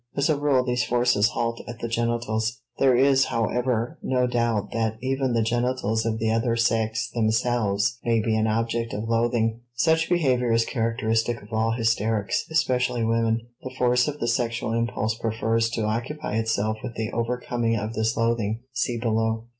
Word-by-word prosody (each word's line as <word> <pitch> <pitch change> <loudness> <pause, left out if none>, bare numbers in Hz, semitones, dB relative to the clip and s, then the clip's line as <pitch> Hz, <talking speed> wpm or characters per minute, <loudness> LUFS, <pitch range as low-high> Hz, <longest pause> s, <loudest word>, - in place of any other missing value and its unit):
As 140 +2 +1
a - - +2
rule 140 -3 +2
these 125 -1 0
forces 120 -3 +2
halt 115 -1 -2
at 120 -1 -7
the 115 - -4
genitals; 115 0 -1 0.2
there 130 -2 +5
is, 135 +1 +4
however, 120 +1 -1
no 125 -1 +1
doubt 120 -4 0
that 110 -1 -1
even 130 -1 -1
the 115 -1 +2
genitals 115 -1 0
of 110 -1 -1
the 110 0 0
other 115 +1 +1
sex 115 0 0
themselves 110 -1 +1
may 115 -1 +2
be 110 0 0
an 110 0 +1
object 115 +1 -1
of 105 +2 -4
loathing. 115 0 +1
Such 160 +4 +2
behavior 130 -9 +2
is 115 0 +3
characteristic 115 -1 -1
of 105 - -13
all 110 +1 +1
hysterics, 110 -3 0
especially 125 -6 +1
women. 115 0 +1 0.2
The 130 0 -8
force 125 0 +3
of 150 0 -4
the 120 - -1
sexual 115 -1 -1
impulse 115 -2 0
prefers 115 0 0
to 115 -1 -2
occupy 120 +4 -2
itself 110 -1 0
with 120 - -6
the 110 -1 -3
overcoming 120 0 -1
of 110 +1 -3
this 110 +1 0
loathing 115 -1 0
(see 120 -1 -1
below). 110 -1 0
115 Hz, 170 wpm, -25 LUFS, 110-125 Hz, 0.2 s, there